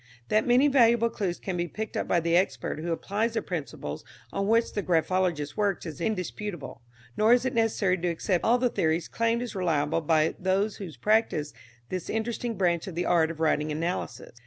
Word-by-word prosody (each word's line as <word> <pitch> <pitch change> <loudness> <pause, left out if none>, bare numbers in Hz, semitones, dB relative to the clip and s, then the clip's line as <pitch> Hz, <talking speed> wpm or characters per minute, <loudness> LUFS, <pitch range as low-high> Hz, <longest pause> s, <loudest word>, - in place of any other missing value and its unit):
That 215 +3 +2
many 250 +4 +5
valuable 235 -4 +4
clues 180 -4 -2
can 190 - -4
be 175 0 -1
picked 220 +4 -6
up - - -1
by 175 - +3
the 170 +1 +1
expert 180 -3 0
who 170 +2 -3
applies 210 +7 -1
the - - +1
principles 120 - -5 0.3
on 195 0 -1
which 230 +2 +2
the 205 - -1
graphologist 175 -4 0
works 200 -4 0
is 160 -2 -7
indisputable, 180 - -4 0.3
nor 220 +2 +5
is 245 +1 +3
it 260 - 0
necessary 210 -5 +1
to 175 - -1
accept 175 +1 0
all 240 +2 +4
the 250 0 +2
theories 160 -4 0
claimed 230 +1 0
as 245 - -6
reliable 165 -4 0
by 155 0 +2
those 195 +3 0
who 195 -4 -6
practice 210 -9 +1 0.4
this 185 -2 -4
interesting 230 +1 -2
branch 175 -1 +1
of 185 - -6
the 175 - -1
art 165 -2 +3
of 165 -1 -7
writing 155 -1 +1
analysis. 160 -6 -4
185 Hz, 195 wpm, -27 LUFS, 165-220 Hz, 0.4 s, many